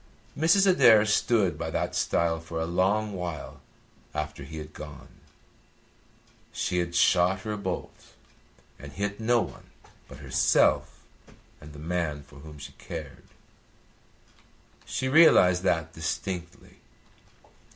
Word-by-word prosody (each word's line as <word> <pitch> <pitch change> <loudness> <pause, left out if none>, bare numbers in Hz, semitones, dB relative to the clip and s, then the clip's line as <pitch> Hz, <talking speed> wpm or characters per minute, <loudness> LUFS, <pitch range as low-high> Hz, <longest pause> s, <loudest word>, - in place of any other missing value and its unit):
Mrs. 165 +6 +4
Adair 115 - +6
stood 105 -2 +1
by - - -3
that - - -2
stile 85 -1 0
for 80 0 -6
a 80 - -1
long 100 +5 0
while 85 -5 -6 0.5
after 75 -2 -4
he 80 +3 -9
had 75 0 -8
gone. 75 -1 -10 1.4
She 90 -1 -2
had 85 0 -3
shot 90 +2 +3
her 105 0 -4
bolt 95 -3 -6 0.6
and 70 0 -11
hit 100 +1 -3
no 120 +1 +2
one - - -12 0.4
but - - -12
herself - - +1 0.6
and 75 0 -12
the 75 - -12
man 80 -2 -3
for 75 +1 -17
whom 75 +1 -12
she 70 - -10
cared. - - -8 1.6
She 130 - -2
realised 130 - +6
that 80 -3 0
distinctly. 85 +2 -5
90 Hz, 120 wpm, -27 LUFS, 80-105 Hz, 1.6 s, Adair